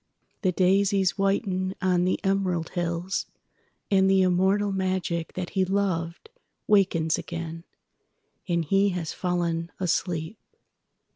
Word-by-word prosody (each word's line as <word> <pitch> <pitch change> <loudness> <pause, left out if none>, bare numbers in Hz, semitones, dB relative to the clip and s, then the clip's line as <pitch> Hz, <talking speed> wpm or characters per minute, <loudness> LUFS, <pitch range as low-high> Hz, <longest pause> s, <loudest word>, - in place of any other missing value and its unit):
The 185 -4 +2
daisies 195 +1 +2
whiten 195 -1 0
on 180 -1 +2
the 185 - +1
emerald 190 -4 0
hills, 175 +2 -2 0.6
And 190 -1 +4
the 190 -1 +4
immortal 190 +3 +2
magic 185 -3 -2
that 180 -1 -5
he 190 -2 +1
lovedWakens 190 - 0
again—and 170 +1 -7
he 195 +5 +3
has 175 -4 -3
fallen 170 -2 -1
asleep." 180 +1 -1
185 Hz, 100 wpm, -26 LUFS, 170-195 Hz, 0.6 s, And